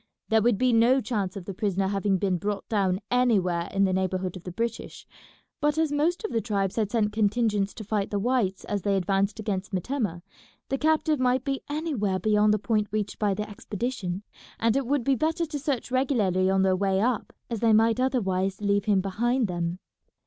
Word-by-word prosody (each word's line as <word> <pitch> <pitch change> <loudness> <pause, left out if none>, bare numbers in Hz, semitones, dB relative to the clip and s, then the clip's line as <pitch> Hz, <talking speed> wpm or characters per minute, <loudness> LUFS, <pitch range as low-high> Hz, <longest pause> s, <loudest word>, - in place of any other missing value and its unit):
There 220 0 +4
would 235 -1 +3
be 255 +2 +2
no 235 +4 +5
chance 205 -7 -2
of 185 - -8
the 195 - -5
prisoner 195 0 0
having 195 0 +1
been 185 -1 0
brought 205 +2 -3
down 195 -3 0
anywhere 195 -9 +2
in 195 - +2
the 190 -1 +2
neighbourhood 185 -1 -1
of 180 - -10
the 180 - -5
British, 230 +4 -4 0.5
but 295 +1 +1
as 320 -2 +1
most 320 +7 0
of 435 - -3
the 225 - 0
tribes 200 -4 -1
had 215 -3 0
sent 210 -2 0
contingents 210 -1 +1
to 220 - -7
fight 205 -1 -1
the 205 - -1
whites 210 -3 0
as 205 -1 -2
they 200 +1 +1
advanced 195 +3 0
against 200 -2 -3
Metemmeh, 190 -3 -2 0.5
the 270 - -1
captive 310 -1 +2
might 255 0 +2
be 275 -1 -2
anywhere 285 - -1
beyond 210 +2 +3
the 210 - +3
point 210 0 0
reached 210 -1 -3
by 205 -2 +1
the 210 +1 -3
expedition, 205 -2 -4 0.4
and 230 0 +2
it 275 -3 0
would 280 -1 +1
be 275 - +2
better 320 +6 0
to 300 -2 -5
search 270 -4 -2
regularly 215 -9 +2
on 190 0 +3
their 190 -1 +3
way 190 0 +1
up, 235 +2 0 0.2
as 230 - -2
they 230 0 +3
might 225 +2 +4
otherwise 195 -7 0
leave 200 -1 +1
him 200 -3 +3
behind 235 +5 0
them. 175 -1 -2
210 Hz, 205 wpm, -26 LUFS, 195-245 Hz, 0.5 s, no